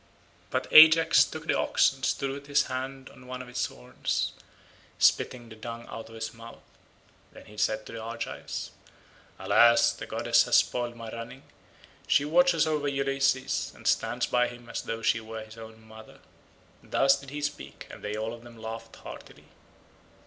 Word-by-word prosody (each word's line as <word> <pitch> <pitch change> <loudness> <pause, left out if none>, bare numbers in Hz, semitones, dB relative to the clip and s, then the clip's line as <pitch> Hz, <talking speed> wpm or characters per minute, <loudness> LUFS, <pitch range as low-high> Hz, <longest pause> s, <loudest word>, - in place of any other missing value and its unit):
But - - -1
Ajax 160 +1 +8
took - - -7
the - - +1
ox - - +3
and 135 -1 -17
stood 135 0 0
with 140 +1 -8
his 145 0 +3
hand 130 +1 -5
on 125 - -16
one 130 0 -6
of - - -14
its 125 - -1
horns, 60 0 -3 0.7
spitting 120 -2 +2
the 110 - -12
dung 115 +1 -8
out 115 0 -8
of 115 - -12
his 110 0 -5
mouth. 115 0 -13 0.7
Then - - -14
he 105 - -15
said 110 +1 0
to - - -10
the 115 - -6
Argives, 115 +1 -6 0.7
"Alas, 120 0 +5
the - - -8
goddess - - +2
has - - +2
spoiled 120 -1 +1
my 115 -1 -8
running; 115 +4 -8 0.6
she 145 -1 +3
watches 170 +1 +4
over 150 -2 -1
Ulysses 135 -1 0
and - - -16
stands - - +1
by 125 0 +2
him 120 -1 -11
as - - -4
though 115 0 -5
she 115 - +2
were 110 0 -7
his 110 +1 -13
own 110 0 -11
mother." 110 0 -14 0.6
Thus 135 0 +2
did 140 -1 -11
he 145 +2 -6
speak 145 0 -5
and - - -12
they 105 0 -3
all 110 +1 -3
of 120 - -10
them 120 -1 -14
laughed 110 +1 -8
heartily. - - -12
120 Hz, 180 wpm, -28 LUFS, 115-135 Hz, 0.7 s, Ajax